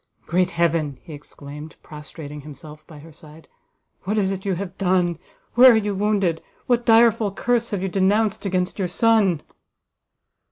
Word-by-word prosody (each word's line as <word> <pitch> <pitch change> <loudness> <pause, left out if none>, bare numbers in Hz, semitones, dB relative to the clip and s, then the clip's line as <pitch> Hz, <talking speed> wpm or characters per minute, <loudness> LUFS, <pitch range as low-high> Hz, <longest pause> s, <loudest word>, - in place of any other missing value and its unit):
"Great 180 +2 +1
Heaven!" 165 -5 -1
he 165 - -11
exclaimed, 145 +1 -11
prostrating 150 -1 -10
himself 150 +1 -13
by 155 - -13
her 160 +3 -14
side, 155 +1 -15 0.6
"what 210 +3 -1
is 195 -2 +1
it 195 0 -6
you 195 -2 0
have 185 0 -6
done! 180 -3 +1 0.3
where 250 +1 +8
are - - +3
you 205 -1 -1
wounded? 195 -4 0 0.2
what 240 -1 0
direful 225 -2 +4
curse 235 +3 -1
have 195 -3 -3
you - - -1
denounced 200 +3 +1
against 185 -1 -2
your 190 - 0
son?" 205 -6 +2
185 Hz, 160 wpm, -22 LUFS, 160-210 Hz, 0.6 s, where